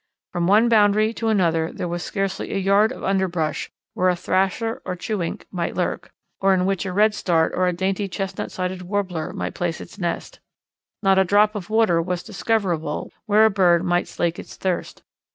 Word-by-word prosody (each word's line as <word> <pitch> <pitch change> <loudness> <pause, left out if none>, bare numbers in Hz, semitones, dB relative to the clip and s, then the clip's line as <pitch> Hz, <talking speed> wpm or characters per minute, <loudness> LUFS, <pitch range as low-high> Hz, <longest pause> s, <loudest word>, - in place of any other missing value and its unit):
From 175 -1 -1
one 215 +5 +5
boundary 215 -1 +4
to 225 - -3
another 165 -6 +2
there - - -4
was 175 0 -3
scarcely 195 +1 -3
a - - -1
yard 200 +3 +3
of - - -8
underbrush 180 -5 -1 0.2
where 185 0 +2
a 180 - +2
Thrasher 195 +7 0
or 180 - -4
Chewink 180 -2 -4
might 175 -2 -3
lurk, - - -2 0.3
or 195 0 +4
in 180 0 +1
which 195 0 -1
a - - -3
Redstart, 190 -5 +2
or 185 0 +1
a - - +2
dainty 190 +3 -1
Chestnut 195 +1 -4
sided 185 0 -3
Warbler, 180 -4 -2
might - - -4
place 170 -2 -2
its 200 - -11
nest. 175 -2 -3 0.6
Not 195 -1 +4
a - - +6
drop 205 +3 +3
of 205 -3 -6
water 215 -7 +3
was 180 +1 -3
discoverable, 180 -9 -1 0.2
where 215 +1 +5
a 220 - +4
bird 180 -3 +3
might 175 -1 +1
slake 170 0 -2
its - - -10
thirst. 185 -2 -3
190 Hz, 190 wpm, -22 LUFS, 175-205 Hz, 0.6 s, a